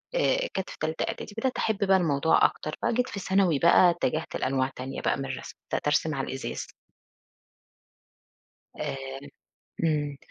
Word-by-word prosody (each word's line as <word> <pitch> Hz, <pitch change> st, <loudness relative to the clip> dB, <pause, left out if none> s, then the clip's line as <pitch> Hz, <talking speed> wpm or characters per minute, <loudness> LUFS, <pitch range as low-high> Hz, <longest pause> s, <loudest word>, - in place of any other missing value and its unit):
آآ، -, -, +2 dB
كانت 190 Hz, -, -3 dB
في -, -, -9 dB
تالتة 155 Hz, +1 st, -1 dB
اعدادي -, -, -5 dB
بدأت 255 Hz, +3 st, -1 dB
أحب 220 Hz, -2 st, 0 dB
بقى 190 Hz, 0 st, +6 dB
الموضوع 160 Hz, -3 st, +3 dB
أكتر 155 Hz, -, -1 dB
بقى 235 Hz, -, +2 dB
جيت 250 Hz, +2 st, +1 dB
في 200 Hz, -, -5 dB
ثانوي 190 Hz, -6 st, +2 dB
بقى 170 Hz, +2 st, +6 dB
اتجهت 165 Hz, -2 st, -1 dB
لأنواع 130 Hz, 0 st, 0 dB
تانية 130 Hz, +2 st, -5 dB
بقى -, -, +1 dB
من 135 Hz, -, -3 dB
الرسم، 130 Hz, -1 st, -6 dB, 0.2 s
بدأت -, -, -1 dB
أرسم 155 Hz, 0 st, +2 dB
على 135 Hz, -, -2 dB
الإزاز. 135 Hz, +1 st, -4 dB, 2.1 s
آمم، 135 Hz, +1 st, -5 dB, 0.5 s
إمم، 145 Hz, -3 st, 0 dB
155 Hz, 155 wpm, -27 LUFS, 135-190 Hz, 2.1 s, بقى